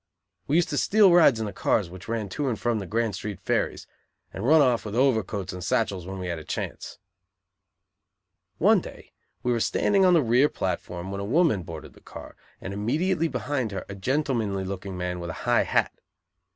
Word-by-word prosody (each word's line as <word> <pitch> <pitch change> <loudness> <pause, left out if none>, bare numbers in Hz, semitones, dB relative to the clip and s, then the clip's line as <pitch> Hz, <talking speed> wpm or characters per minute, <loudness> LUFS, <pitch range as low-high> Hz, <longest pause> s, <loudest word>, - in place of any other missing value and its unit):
We 145 - +1
used 175 0 +3
to - - 0
steal 205 -3 +5
rides 155 -9 +6
in 110 - -2
the 105 - -5
cars 100 +1 +1
which 95 0 -11
ran 115 -2 -2
to 140 +7 -2
and 115 - -3
from 120 -2 0
the 95 - -6
Grand 115 +2 0
Street 100 0 -5
ferries; - - -1 0.5
and 95 - -6
run 155 +6 +5
off 125 -5 +3
with 105 0 -6
overcoats 110 -7 0
and 90 -1 -7
satchels 95 -4 -1
when 95 0 -6
we 90 - -5
had 85 -2 -3
a - - -10
chance. - - -5 1.6
One - - +4
day - - -12 0.3
we 125 - +1
were 120 - +1
standing 195 - +2
on 180 -1 +5
the 160 - +4
rear 125 +5 +4
platform 90 0 -4
when 100 0 -4
a - - -3
woman 135 - +2
boarded 80 -2 -9
the - - -19
car, - - -11 0.2
and 95 - -6
immediately 160 - 0
behind 135 -7 -2
her 95 - -5
a 100 - -7
gentlemanly 115 -3 -1
looking 95 0 -6
man 90 0 -3
with 85 -1 -6
a - - -4
high - - +3
hat. - - +1
110 Hz, 205 wpm, -26 LUFS, 95-135 Hz, 1.6 s, rides